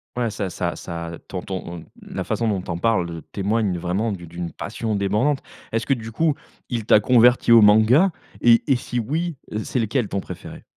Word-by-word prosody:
Ouais 120 -3 -1
ça 100 -2 -3
ça 85 0 -3
ça, 85 -1 -6 0.2
ton 90 -2 -5
ton, 85 -3 -6 0.2
la - - -5
façon 115 - -1
dont 100 -3 0
tu 90 - -6
en 85 - -2
parles, 110 -4 +1
heu, 85 -1 -7
témoigne 100 -2 0
vraiment 95 +6 -1
d'une 85 -4 -7
d'une 85 0 -6
passion 110 -2 -4
débordante. 105 +9 +1 0.3
Est-ce 115 0 -1
que 135 - +2
du 115 -3 -5
coup, 155 +5 +1 0.4
il 115 -4 -3
t'a 110 - +6
converti 120 +1 +4
au 115 -1 +9
manga? 110 - +6 0.3
Et 115 -1 +5
et 135 - +6
si 125 0 -3
oui, 160 +8 -2 0.3
c'est - - -3
lequel 115 +1 0
ton 100 - -2
préféré? - - -9
110 Hz, 200 wpm, -22 LUFS, 95-120 Hz, 0.4 s, au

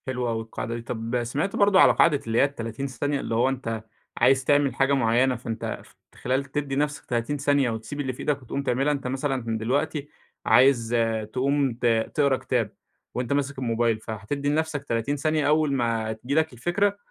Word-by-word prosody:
حلوة 125 -2 -1
أوي 115 0 -2
القاعدة 115 +1 -5
دي. 120 - -5
طب 115 +1 -3
سمعت 145 +11 -2
برضو 200 -1 +4
على - - +7
قاعدة 150 -4 +4
اللي 115 0 0
هي - - +6
ال30 135 -2 -3
ثانية؟ 140 +2 -2
اللي 115 - -3
هو 120 +3 +3
أنت 115 -4 -4 0.3
عايز 130 +2 +4
تعمل 145 -3 +3
حاجة 135 +1 +2
معيّنة، 125 0 +3
فأنت 115 -1 -5
ف - - -22 0.2
فخلال 130 +2 -2
تدّي 140 0 -3
نفسك 150 +1 -1
30 120 +4 -1
ثانية، 140 -2 +2
وتسيب 115 +6 -5
اللي 130 -3 -2
في - - -15
إيدك 145 -2 -1
وتقوم 135 +3 -4
تعملها. 135 +2 +1
أنت 140 -3 -3
مثلًا 130 -4 -2
دلوقتي 140 +5 -1 0.4
عايز 120 -3 +4 0.4
تقوم 135 0 +1
ت - - 0 0.3
تقرا 140 -3 +3
كتاب، 120 -6 -1 0.4
وأنت 125 +2 -2
ماسك 140 -1 -1
الموبايل، 115 -2 +1
فهتدي 110 +7 -4
لنفسك 155 -1 -1
30 115 +2 -1
ثانية. 155 0 0
أول 150 -1 +3
ما 115 -4 0
تيجي 120 +6 -4
لك 160 -2 +2
الفكرة، 195 - 0
135 Hz, 185 wpm, -25 LUFS, 115-145 Hz, 0.4 s, على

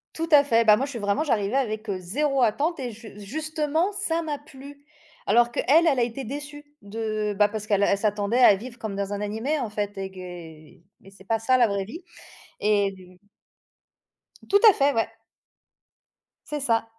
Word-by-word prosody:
Tout 330 +1 -3
à 285 -1 +7
fait. 230 -3 +3
Bah, 210 -2 +6
moi, 265 - -1
je 280 - -8
suis 240 - -6
vraiment 205 +7 0
j'arrivais 230 -2 0
avec, 215 -4 -2
heu, 195 - -1
0 275 +10 -1
attente 285 +8 +1
et 250 -2 -4
j 220 -1 -12
justement, 315 - -2
ça 365 -5 -1
m'a 300 -3 -3
plu. 285 0 -14 0.4
Alors 240 0 +4
qu'elle, - - -2 0.2
elle 275 -5 +3
a 240 - +3
été 245 +3 -4
déçue 290 +4 -7 0.2
de 215 0 -3
bah, 210 0 +4
parce 210 0 -6
qu'elle, 205 -1 +2
elle 200 - +3
s'attendait 210 +3 0
à 240 -5 +7
vivre 235 +5 -9
comme 210 -3 -5
dans 200 0 -3
un 205 - -3
animé 225 +9 -2
en 240 - -3
fait 205 -1 -4
et 195 0 -4
gué 170 -4 -11 0.2
et 195 - -15
c'est 195 -1 -17
pas 225 +2 0
ça 255 +3 +2
la 240 -2 +4
vraie 200 -1 -2
vie, 285 - -10 0.6
et 195 -3 -1 1.3
Tout 405 0 +5
à - - +5
fait, 280 0 +2
ouais. 225 -3 +1 1.4
C'est 300 - -4
ça. 230 -5 +1
225 Hz, 195 wpm, -25 LUFS, 205-280 Hz, 1.4 s, à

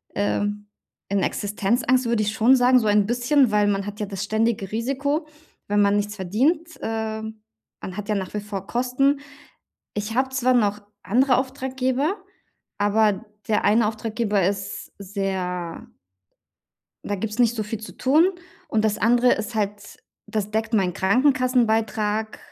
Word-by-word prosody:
ähm, 205 0 -1 0.4
in 200 0 +1
Existenzangst, 235 +5 0
würde 230 -2 +1
ich 210 0 -1
schon 230 +4 +5
sagen, 250 0 +5
so 220 - -1
ein 205 -1 +4
bisschen, 245 +2 +3
weil 210 0 +3
man 200 -1 0
hat 205 0 -7
ja 210 - -1
das 195 -1 -4
ständige 215 -2 0
Risiko, 280 +7 -1 0.4
wenn 205 0 +2
man 200 0 +3
nichts 205 0 -2
verdient. 260 - 0
Ähm, 220 -1 -4 0.4
man 185 0 -7
hat 210 +1 -6
ja 210 - +1
nach 190 -2 -4
wie 210 - -1
vor 200 -2 -6
Kosten. 255 +3 +1 0.8
Ich 210 +2 -3
habe 260 +1 +2
zwar 255 -1 +1
noch 210 -3 +1 0.2
andere 255 +4 +3
Auftraggeber, 260 +4 -1 0.6
aber 205 0 +2 0.2
der 215 - +1
eine 215 +2 +4
Auftraggeber 215 -2 -1
ist 195 0 -4
sehr 185 -3 -4 1.2
da 205 - -2
gibt's 215 +3 -4
nicht 235 -1 +4
so 220 - -2
viel 210 +1 -5
zu 220 - -10
tun. 310 +8 +4 0.4
Und 220 -1 +1
das 215 -1 +1
andere 245 +2 +4
ist 220 +2 -3
halt 205 -1 -3 0.3
das 210 -1 -2
deckt 220 +2 -1
meinen 190 -4 +2
Krankenkassenbeitrag, 225 - +1
220 Hz, 150 wpm, -23 LUFS, 205-245 Hz, 1.2 s, schon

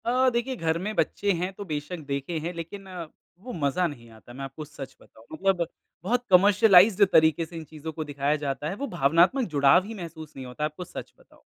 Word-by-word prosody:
अ, 255 +2 +3
देखिए 240 +2 -1
घर 165 -6 0
में 210 +4 -3
बच्चे 200 0 +1
हैं 180 +2 -2
तो 200 +2 -8
बेशक़ 155 +1 -4
देखे 140 +4 -3
हैं 170 +3 -4
लेकिन 170 +4 -7
अ, 180 -3 -7 0.3
वो 245 +6 -8
मज़ा 160 +3 0
नहीं 120 -7 -10
आता, 110 +2 -15
मैं 135 +2 -7
आपको 135 +3 -7
सच 145 -2 -10
बताऊँ। 110 - -19
मतलब 180 0 0 0.4
बहुत 245 +6 0
कमर्शियलाइज़्ड 200 +1 +6
तरीके 160 +1 +4
से 160 - -13
इन 165 - -6
चीज़ों 155 +1 -8
को 155 - -4
दिखाया 145 0 -1
जाता 145 +2 -2
है, 190 - -4
वो 280 +6 -4
भावनात्मक 175 - +3
जुड़ाव 140 +4 +5
ही 225 - -7
महसूस 165 -5 -9
नहीं 130 - -7
होता 125 +4 -6
है, - - +3
आपको 155 +4 -8
सच - - -9
बताऊँ। - - -23
165 Hz, 220 wpm, -26 LUFS, 145-195 Hz, 0.4 s, कमर्शियलाइज़्ड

